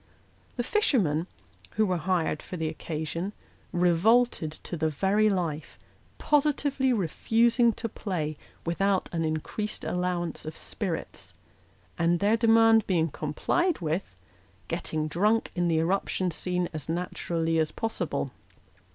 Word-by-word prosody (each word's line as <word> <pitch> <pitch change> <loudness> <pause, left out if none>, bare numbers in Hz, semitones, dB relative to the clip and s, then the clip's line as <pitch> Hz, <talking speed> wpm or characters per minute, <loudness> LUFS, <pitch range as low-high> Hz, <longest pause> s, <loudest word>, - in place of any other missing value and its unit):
The 240 - -1
fishermen, 200 - +2 0.5
who 220 - +3
were 185 -3 0
hired 170 -2 0
for 180 - -7
the 160 -1 -1
occasion, 160 +4 -4 0.4
revolted 180 +1 +3
to - - -4
the 160 -1 0
very 200 +7 +2
life, 165 -6 -2 0.4
positively 285 -2 +2
re 210 -7 +1
fusing 235 - +3
to 230 - -3
play 175 -8 -3 0.3
without 190 +3 +1
an 165 -1 0
increased 160 +7 -3
allowance 180 -2 -2
of 155 0 -6
spirits; - - -5 0.6
and, 170 0 +3
their 205 +2 +3
demand 225 -1 +5
being 165 -4 +2
complied 290 - 0
with, 160 - -3 0.5
getting 155 -1 -2
drunk 210 +8 +1
in 175 -1 0
the 165 -1 +2
eruption 180 +2 0
scene 180 +1 -1
as 155 -1 -6
naturally 165 -1 -1
as 155 -1 +1
possible. 225 -1 -2
180 Hz, 125 wpm, -28 LUFS, 160-220 Hz, 0.6 s, demand